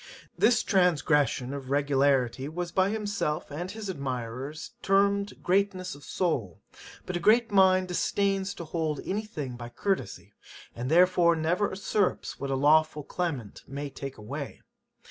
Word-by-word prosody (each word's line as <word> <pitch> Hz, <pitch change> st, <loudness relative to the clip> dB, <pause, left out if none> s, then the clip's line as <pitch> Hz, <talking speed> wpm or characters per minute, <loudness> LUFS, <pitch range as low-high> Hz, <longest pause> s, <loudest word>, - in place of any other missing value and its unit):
This 240 Hz, -2 st, +3 dB
transgression 150 Hz, -, +2 dB
of 135 Hz, -2 st, -6 dB
regularity 140 Hz, -2 st, +2 dB
was 175 Hz, +2 st, -4 dB
by 190 Hz, +1 st, +2 dB
himself 205 Hz, -9 st, -2 dB
and 175 Hz, +5 st, -4 dB
his 215 Hz, +1 st, -6 dB
admirers 135 Hz, -, -5 dB
termed 200 Hz, +1 st, +1 dB
greatness 185 Hz, -1 st, +1 dB
of 145 Hz, -, -13 dB
soul; 125 Hz, -, -2 dB, 0.5 s
but 185 Hz, -, -4 dB
a -, -, 0 dB
great 225 Hz, +5 st, +4 dB
mind 185 Hz, -1 st, +5 dB
disdains 195 Hz, +2 st, 0 dB
to 170 Hz, -, -7 dB
hold 160 Hz, -2 st, -2 dB
any 210 Hz, +3 st, -2 dB
thing 140 Hz, -, -6 dB
by 120 Hz, 0 st, -7 dB
courtesy, 195 Hz, +11 st, -3 dB, 0.4 s
and 125 Hz, +2 st, -4 dB
therefore 175 Hz, 0 st, +5 dB
never 170 Hz, +6 st, +1 dB
usurps 195 Hz, 0 st, -1 dB
what 140 Hz, -, -4 dB
a 135 Hz, -, 0 dB
lawful 150 Hz, +2 st, +3 dB
claimant 145 Hz, -, -4 dB
may 140 Hz, +1 st, -5 dB
take 135 Hz, 0 st, -7 dB
away. 135 Hz, +7 st, -7 dB
165 Hz, 145 wpm, -28 LUFS, 140-190 Hz, 0.5 s, mind